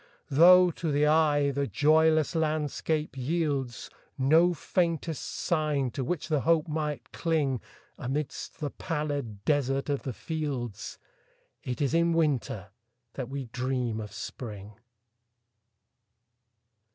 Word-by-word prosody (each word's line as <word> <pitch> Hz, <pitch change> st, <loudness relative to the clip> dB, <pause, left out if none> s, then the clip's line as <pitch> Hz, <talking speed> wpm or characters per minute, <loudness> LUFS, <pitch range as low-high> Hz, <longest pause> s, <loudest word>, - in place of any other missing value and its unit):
Though, 180 Hz, +5 st, +7 dB
to 160 Hz, -1 st, -3 dB
the 145 Hz, +1 st, +3 dB
eye, 150 Hz, -2 st, +3 dB
the 140 Hz, 0 st, -1 dB
joyless 155 Hz, -, +3 dB
landscape 155 Hz, -1 st, -1 dB
yieldsNo 145 Hz, +2 st, 0 dB
faintest 165 Hz, -2 st, -1 dB
sign 150 Hz, -6 st, -1 dB
to 135 Hz, -, -3 dB
which 165 Hz, +5 st, -2 dB
the 155 Hz, -2 st, +1 dB
hope 165 Hz, +1 st, +2 dB
might 150 Hz, -1 st, -3 dB
cling,—Amidst 145 Hz, -2 st, -3 dB
the 145 Hz, -2 st, -3 dB
pallid 145 Hz, -, -4 dB
desert 135 Hz, -1 st, +1 dB
of 140 Hz, -1 st, 0 dB
the 130 Hz, -, -4 dB
fields,—It 125 Hz, -, -6 dB
is 140 Hz, -, 0 dB
in 170 Hz, 0 st, +3 dB
Winter 130 Hz, -, 0 dB, 0.4 s
that 125 Hz, -, -5 dB
we 135 Hz, -1 st, -4 dB
dream 125 Hz, -1 st, -2 dB
of 105 Hz, -1 st, -6 dB
Spring. 105 Hz, -4 st, -7 dB
145 Hz, 105 wpm, -28 LUFS, 130-160 Hz, 0.4 s, Though